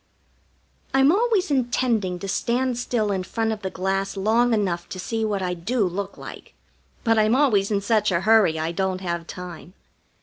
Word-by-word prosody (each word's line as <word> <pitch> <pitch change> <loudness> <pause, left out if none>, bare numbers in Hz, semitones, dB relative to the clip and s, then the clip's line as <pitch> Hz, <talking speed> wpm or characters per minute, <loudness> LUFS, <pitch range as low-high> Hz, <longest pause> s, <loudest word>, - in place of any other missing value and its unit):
I'm 270 +2 +5
always 410 -3 +1
intending 240 -7 0
to 195 - -6
stand 245 +5 0
still 225 -4 -1
in 190 -2 -1
front 225 +4 -2
of 215 -1 -4
the 190 - -3
glass 195 +1 -2
long 225 +5 +2
enough 185 -6 -1
to 185 - -7
see 225 +4 -2
what 205 -3 -1
I 180 -1 -1
do 205 +6 -1
look 195 +2 -4
like, - - -11 0.5
but 225 -2 +3
I'm 215 +2 +3
always 220 -9 +3
in 205 -2 0
such 215 0 +1
a 170 -1 +1
hurry 210 -5 +4
I 160 +1 -2
don't 190 +1 -2
have 170 -2 -3
time. 180 0 -9
205 Hz, 180 wpm, -23 LUFS, 185-235 Hz, 0.5 s, I'm